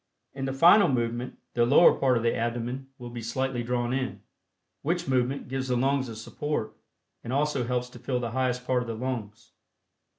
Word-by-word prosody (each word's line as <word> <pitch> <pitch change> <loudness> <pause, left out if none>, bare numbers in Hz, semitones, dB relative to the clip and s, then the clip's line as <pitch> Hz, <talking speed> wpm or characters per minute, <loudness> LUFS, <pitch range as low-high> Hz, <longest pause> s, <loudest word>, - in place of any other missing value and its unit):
In 135 0 -4
the 135 - -1
final 175 +9 +7
movement, 120 -1 -2 0.2
the 120 - +3
lower 140 +8 +7
part 130 -2 +2
of 115 - -2
the 115 - +2
abdomen 120 +3 -3
will 120 -1 -8
be 120 -1 -6
slightly 125 +2 -2
drawn 120 0 -1
in, 130 -1 -3 0.6
which 170 +2 -1
movement 130 +1 0
gives 130 +1 -3
the 125 - +1
lungs 135 0 +1
a 115 - -7
support 115 +2 -4 0.5
and 120 - -5
also 140 -2 +1
helps 125 0 -1
to - - -12
fill 125 -2 -1
the 120 -2 -3
highest 125 0 -1
part 125 -1 +1
of 120 - -5
the 115 - -3
lungs. 115 -3 -5
125 Hz, 195 wpm, -27 LUFS, 120-135 Hz, 0.6 s, final